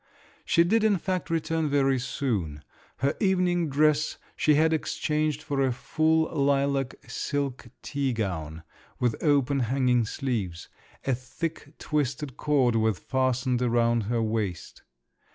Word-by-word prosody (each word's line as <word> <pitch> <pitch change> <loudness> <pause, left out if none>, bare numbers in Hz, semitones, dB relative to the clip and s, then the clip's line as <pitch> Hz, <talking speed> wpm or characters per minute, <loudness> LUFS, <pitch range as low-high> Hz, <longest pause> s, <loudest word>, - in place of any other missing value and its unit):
She 170 - +4
did 220 +6 +2
in 210 -3 +4
fact 185 +1 -3
return 165 -1 0
very 135 -2 +2
soon. 100 - -2 0.3
Her 140 +3 0
evening 180 -4 +2
dress 150 +2 +2 0.2
she 150 - +3
had 160 +2 +3
exchanged 155 -1 -1
for 145 -3 -1
a 135 -1 +2
full 160 +5 +1
lilac 140 -2 +1
silk 140 -4 -3 0.2
tea 140 -2 -1
gown, 85 -8 -3 0.4
with 120 -3 +1
open 140 -3 +3
hanging 125 -1 +2
sleeves; 105 -11 -3 0.4
a 135 - +2
thick 145 +5 -5
twisted 140 -2 -2
cord 135 -6 +2
was 110 -3 +2
fastened 130 -1 0
round 120 -2 +2
her 115 +1 0
waist. 110 -6 -3
135 Hz, 130 wpm, -27 LUFS, 120-155 Hz, 0.4 s, She